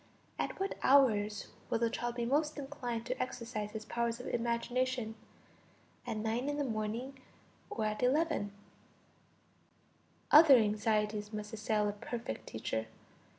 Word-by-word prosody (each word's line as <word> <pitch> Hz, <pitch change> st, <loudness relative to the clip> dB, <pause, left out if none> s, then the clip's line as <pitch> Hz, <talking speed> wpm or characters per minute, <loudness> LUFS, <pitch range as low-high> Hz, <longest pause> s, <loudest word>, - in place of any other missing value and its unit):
At -, -, -2 dB
what 390 Hz, 0 st, -2 dB
hours 215 Hz, -7 st, +4 dB, 0.2 s
will -, -, +2 dB
the 230 Hz, 0 st, +1 dB
child 240 Hz, 0 st, -2 dB
be 240 Hz, -1 st, -1 dB
most 300 Hz, +5 st, +1 dB
inclined 255 Hz, -5 st, -4 dB
to -, -, -2 dB
exercise 230 Hz, -4 st, -3 dB
his 215 Hz, 0 st, -7 dB
powers 235 Hz, +1 st, -1 dB
of 245 Hz, -, -7 dB
imagination, 240 Hz, 0 st, -1 dB, 0.9 s
at 220 Hz, -, -2 dB
9 225 Hz, +5 st, -1 dB
in 290 Hz, -, -2 dB
the 290 Hz, -, +1 dB
morning 230 Hz, +3 st, -3 dB, 0.5 s
or 220 Hz, -, -2 dB
at 215 Hz, 0 st, -2 dB
11? 250 Hz, -6 st, +2 dB, 1.8 s
Other 300 Hz, -2 st, +10 dB
anxieties 210 Hz, -1 st, +1 dB
must 210 Hz, 0 st, -6 dB
assail 215 Hz, -1 st, +1 dB
a -, -, +1 dB
perfect 210 Hz, -, -6 dB
teacher! 110 Hz, 0 st, -3 dB
230 Hz, 135 wpm, -33 LUFS, 215-255 Hz, 1.8 s, Other